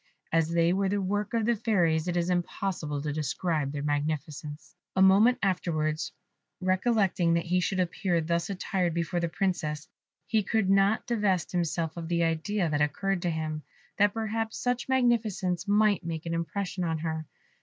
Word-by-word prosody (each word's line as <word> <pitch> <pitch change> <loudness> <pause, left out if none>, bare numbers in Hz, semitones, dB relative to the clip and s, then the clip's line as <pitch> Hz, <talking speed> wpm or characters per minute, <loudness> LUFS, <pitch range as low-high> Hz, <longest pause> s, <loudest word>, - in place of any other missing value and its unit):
As 165 -1 +2
they 170 +1 +3
were 195 0 +1
the 205 +1 0
work 205 +3 -1
of 225 -2 +1
the 235 +1 +3
Fairies, 175 -7 +1
it 175 0 0
is 175 +1 +1
impossible 175 -4 -2
to 150 -1 -2
describe 155 0 -1
their 145 -1 -4
magnificence. 150 +1 -3 0.2
A 190 - +3
moment 205 +6 +6
afterwards, 155 -5 0 0.5
recollecting 185 -2 +2
that 170 - 0
he 180 +1 +2
should 190 +1 -1
appear 180 0 0
thus 170 +2 -1
attired 185 -3 -1
before 170 +1 -1
the 170 -1 -1
Princess, 160 -5 -2 0.4
he 220 -1 +2
could 205 -1 +1
not 195 +2 +3
divest 205 -7 0
himself 170 -2 -1
of 165 -1 -5
the 170 0 +1
idea 165 +4 0
that 150 -1 0
occurred 190 +5 0
to 175 - 0
him, 155 -1 -3 0.4
that 205 +1 +4
perhaps 225 0 -2
such 245 0 -1
magnificence 220 -8 +1
might 205 -1 +3
make 165 -1 -4
an 165 - -2
impression 180 +3 -2
on 165 -2 0
her. 160 -1 -3
175 Hz, 170 wpm, -28 LUFS, 160-200 Hz, 0.5 s, moment